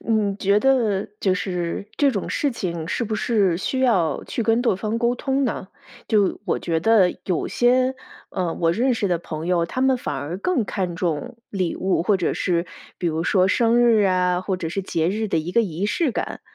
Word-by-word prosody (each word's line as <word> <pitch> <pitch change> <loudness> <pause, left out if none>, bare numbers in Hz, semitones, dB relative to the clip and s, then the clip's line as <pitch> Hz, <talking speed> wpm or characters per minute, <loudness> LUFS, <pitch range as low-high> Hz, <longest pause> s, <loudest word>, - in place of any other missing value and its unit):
你 215 -3 0
觉 200 +1 +2
得 230 -7 +2
就 190 - +2
是 180 0 -3
这 285 -2 +4
种 200 -6 -3
事 290 - 0
情 170 -9 -4
是 235 - -1
不 215 0 -3
是 205 -6 +1
需 260 +8 -2
要 190 -11 +2
去 235 - -3
跟 225 +2 +2
对 240 -6 +2
方 215 +4 -2
沟 240 +1 +1
通 270 +2 0
呢？ 220 -5 -3 0.4
就 205 -3 +2
我 190 - 0
觉 165 -1 -1
得 205 -3 +4
有 180 -4 -1
些， 255 +2 +2 0.4
呃， 180 -3 -2
我 165 -1 +1
认 250 +6 +1
识 215 -3 0
的 175 -2 +1
朋 160 -1 -6
友， 175 -2 +2
他 255 +9 -4
们 265 -1 +3
反 150 - -4
而 145 +6 -4
更 260 - 0
看 180 -4 -3
重 180 +8 -2
礼 185 -4 -2
物， 185 -2 0
或 200 +1 +2
者 180 - -1
是 170 -1 0 0.3
比 175 - -2
如 160 0 0
说 185 0 +3
生 235 +3 +3
日 230 -3 +5
啊， 180 -1 +2
或 190 0 -2
者 165 -3 -4
是 195 +3 -3
节 165 -3 0
日 215 +2 -2
的 165 - +1
一 170 +3 -4
个 235 - +4
仪 185 0 -2
式 300 +5 +1
感， - - -4
195 Hz, 230 characters per minute, -22 LUFS, 175-235 Hz, 0.4 s, 日